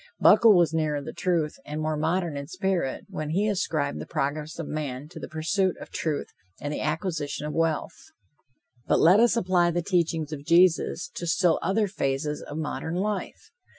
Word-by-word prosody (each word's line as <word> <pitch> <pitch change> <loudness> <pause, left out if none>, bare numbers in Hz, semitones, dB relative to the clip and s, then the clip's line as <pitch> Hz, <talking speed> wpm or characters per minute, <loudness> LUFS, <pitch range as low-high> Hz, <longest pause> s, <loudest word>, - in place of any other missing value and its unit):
Buckle 220 -5 +7
was 170 -3 +3
nearer 155 -2 0
the 140 - -7
truth, 170 -5 -1
and 150 +1 -5
more 155 0 -1
modern 160 +1 -1
in 140 0 -5
spirit, 185 -4 -2
when 155 -6 -5
he 195 +7 +1
ascribed 160 -8 -1
the - - -7
progress 150 +3 -3
of 165 - -4
man 145 -2 -4
to - - -10
the - - -6
pursuit 180 +4 0
of - - -10
truth 155 -3 -2 0.3
and 145 +1 -4
the - - -3
acquisition 155 -2 -2
of 150 - -4
wealth. 165 -2 -1 0.8
But - - +3
let 180 +5 +6
us 235 0 +4
apply 180 -4 +3
the 175 0 -1
teachings 165 -4 0
of 140 -2 -6
Jesus 170 +2 +3
to 175 - -5
still 165 0 +3
other 205 +4 +1
phases 150 -4 -2
of 145 - -7
modern 160 +1 -3
life. 200 +1 -3
165 Hz, 185 wpm, -26 LUFS, 150-185 Hz, 0.8 s, Buckle